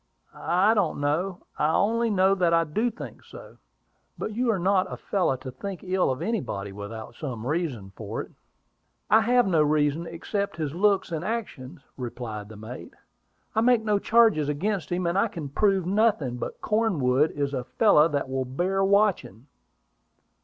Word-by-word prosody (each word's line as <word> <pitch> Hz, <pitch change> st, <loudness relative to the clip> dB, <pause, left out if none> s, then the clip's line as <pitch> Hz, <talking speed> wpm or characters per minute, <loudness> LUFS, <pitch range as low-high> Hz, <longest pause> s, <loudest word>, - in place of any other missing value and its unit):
"I 190 Hz, +5 st, +2 dB
don't 200 Hz, -10 st, 0 dB
know; 170 Hz, +6 st, -1 dB
I 150 Hz, +1 st, +3 dB
only 230 Hz, +3 st, +2 dB
know 190 Hz, -2 st, +3 dB
that 175 Hz, -3 st, +2 dB
I 165 Hz, -, +4 dB
do 210 Hz, +10 st, 0 dB
think 230 Hz, -, -10 dB
so." -, -, -13 dB, 0.6 s
"But -, -, -4 dB
you 245 Hz, +2 st, 0 dB
are 220 Hz, -, +2 dB
not 185 Hz, +1 st, +1 dB
a -, -, -5 dB
fellow 185 Hz, -9 st, 0 dB
to 130 Hz, 0 st, -8 dB
think 195 Hz, +7 st, -7 dB
ill 185 Hz, -1 st, +1 dB
of 130 Hz, 0 st, -2 dB
anybody 120 Hz, -, -3 dB
without 105 Hz, +3 st, -8 dB
some 120 Hz, -4 st, -6 dB
reason 135 Hz, -, -2 dB
for 110 Hz, 0 st, -5 dB
it." -, -, -15 dB, 0.8 s
"I 220 Hz, -, +7 dB
have 245 Hz, +2 st, +3 dB
no 170 Hz, -5 st, +3 dB
reason, 150 Hz, +2 st, +1 dB
except 170 Hz, +2 st, -3 dB
his 150 Hz, -3 st, -3 dB
looks 195 Hz, 0 st, +2 dB
and 160 Hz, -1 st, -3 dB
actions," 175 Hz, -, -5 dB, 0.2 s
replied 115 Hz, -4 st, -6 dB
the 110 Hz, -, -11 dB
mate. 110 Hz, +4 st, -9 dB, 0.6 s
"I 220 Hz, -, +2 dB
make 240 Hz, -1 st, +4 dB
no 210 Hz, -2 st, +1 dB
charges 220 Hz, -10 st, +3 dB
against 180 Hz, +3 st, -2 dB
him, 175 Hz, 0 st, -1 dB
and 170 Hz, +3 st, +1 dB
I 225 Hz, -, +3 dB
can 165 Hz, -8 st, -7 dB
prove 195 Hz, +4 st, +1 dB
nothing; 190 Hz, -, +1 dB
but -, -, -6 dB
Cornwood 155 Hz, -, +2 dB
is 140 Hz, -1 st, -2 dB
a 130 Hz, -2 st, -2 dB
fellow 160 Hz, -, +4 dB
that 145 Hz, -4 st, -2 dB
will 130 Hz, 0 st, -2 dB
bear 180 Hz, +9 st, 0 dB
watching." 195 Hz, -, +1 dB
170 Hz, 175 wpm, -26 LUFS, 135-200 Hz, 0.8 s, I